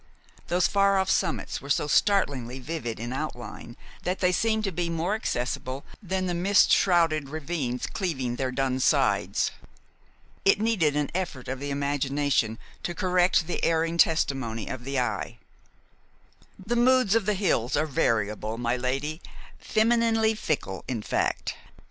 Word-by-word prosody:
Those 180 +1 +2
far 200 -1 +3
off 190 0 +1
summits - - -1
were 140 - -10
so 145 - +2
startlingly 140 - +1
vivid 130 -5 -5
in 120 +2 -4
outline 125 -4 -6 0.2
that 180 +1 -1
they 180 -1 +2
seemed 220 +3 +1
to 195 - -1
be 175 0 -2
more 170 +4 -1
accessible 130 - -3 0.2
than 190 -1 -2
the 180 - -1
mist 190 +3 +4
shrouded 165 -6 +3
ravines 145 -5 -3
cleaving 130 -10 -3
their 130 -1 -1
dun 130 0 0
sides. - - +2 0.9
It 195 - +4
needed 200 -10 +2
an 150 -1 -1
effort 170 -8 -3
of 130 0 -4
the 145 +1 -4
imagination 140 -4 0 0.2
to 175 - -4
correct 180 -2 +2
the 175 - -4
erring 165 +1 +1
testimony 135 -10 +1
of 125 -2 -6
the 135 -1 -1
eye. 110 -5 -2 1.2
"The 210 +5 -3
moods 255 -3 +4
of 225 -3 +2
the 210 - +2
hills 160 - +1
are 155 - +2
variable, 110 -5 0
my 120 +1 0
lady, 135 +6 -2 0.4
femininely 225 0 +2
fickle, 145 - -3
in 115 -5 -3
fact. - - -1
155 Hz, 150 wpm, -26 LUFS, 130-190 Hz, 1.2 s, mist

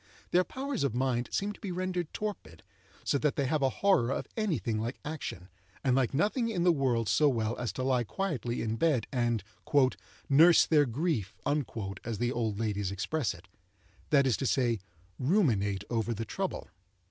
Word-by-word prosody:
Their 180 +1 +4
powers 265 - -3
of 135 -5 0
mind 125 -1 0
seem 205 +1 -1
to - - -17
be 200 -4 -5
rendered 180 -2 -2
torpid, 195 - -6 0.4
so 140 - +1
that 150 -1 +1
they 140 - 0
have 150 +3 0
a 135 - +3 0.2
horror 160 -12 +4
of - - -2
any 215 - 0
thing 110 -2 -2
like 120 +4 -3
action, 145 - -5 0.4
and 130 -2 +3
like 130 -3 +2
nothing 215 - +1
in 180 -6 -1
the 180 - +6
world 125 -7 +1
so 150 +9 +4
well 115 -3 -1
as 120 - -2
to 130 - -3
lie 130 -2 +2
quietly 130 - -2
in 110 0 -2
bed 135 -4 +2
and 120 -5 0 0.8
"nurse 165 +5 +7
their 150 -3 +4
grief," 125 - -1 0.7
as 115 -2 -3
the 120 +2 0
old 110 -4 -1
ladies 105 -3 -1
express 110 - -1
it—that 95 - -3
is 130 -4 +2
to 135 - -1
say, 120 -5 +1 0.4
ruminate 120 - +2
over 115 0 0
the 115 +2 -4
trouble. - - -3
130 Hz, 180 wpm, -30 LUFS, 115-160 Hz, 0.8 s, nurse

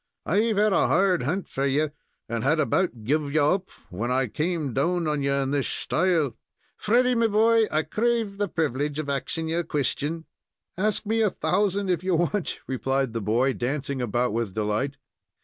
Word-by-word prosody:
I've 215 +4 +1
had 210 0 +3
a - - +3
hard 190 -2 +3
hunt 170 +10 -2
for 135 +1 -1
you, 145 +2 +1 0.4
and 115 -1 -3
had 155 +4 +2
about 155 - 0
guv 145 +4 0
you 150 0 +3
up 185 +6 +1 0.2
when 110 +7 -3
I 130 +1 +2
came 150 - -2
down 170 +6 +1
on 150 -1 0
you 140 0 0
in 140 -1 0
this 145 -2 0
shtyle. 160 -6 0 0.4
Freddy, 250 +4 +2
me 230 -1 +3
boy, 225 +1 +4
I 155 +1 +1
crave 220 +3 -1
the 205 - +1
privilege 145 -3 -1
of 155 -2 -3
axing 160 +4 -2
ye 165 - 0
a 175 - +1
question." 150 +2 -2 0.5
"Ask 215 +3 0
me 225 +2 +1
a 215 - +4
thousand, 200 0 0
if 175 -1 -1
you 185 -2 +1
want," 175 +3 -1
replied 135 -1 -1
the 115 - -2
boy, 120 +6 +1
dancing 135 +1 -2
about 120 0 0
with 115 -4 -2
delight. 110 +6 -1
155 Hz, 185 wpm, -25 LUFS, 135-190 Hz, 0.5 s, boy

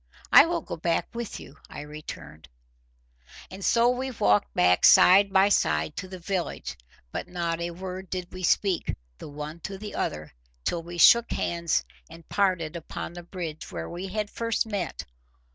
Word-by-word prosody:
"I 280 +5 +9
will 340 0 -1
go - - -7
back 165 +5 -1
with 235 -2 -5
you," 140 - -13
I - - -7
returned. 150 - -10 1.0
And 190 +1 -8
so 235 +4 +4
we 255 +2 -1
walked 105 - +2
back 90 0 +3
side 195 +2 +7
by 195 +1 +5
side 75 - +1
to 185 - -5
the 185 0 -8
village, 180 0 -4 0.4
but - - -5
not 170 -2 -2
a 170 - -2
word 185 +1 -7
did 180 -1 -5
we 185 - -7
speak 185 0 +1 0.2
the - - -9
one 150 +3 -7
to 195 +3 -6
the 210 +1 -8
other, 75 0 -3 0.3
till 170 - -1
we 175 +1 -9
shook 235 +7 +6
hands 170 -1 0 0.2
and 165 +1 -14
parted 180 -5 0
upon 170 0 -6
the 175 - -8
bridge, 170 -3 -7
where 80 -2 -6
we 180 +3 -5
had 210 +2 -3
first 230 -1 -1
met. 200 -6 -4
175 Hz, 175 wpm, -26 LUFS, 160-200 Hz, 1.0 s, I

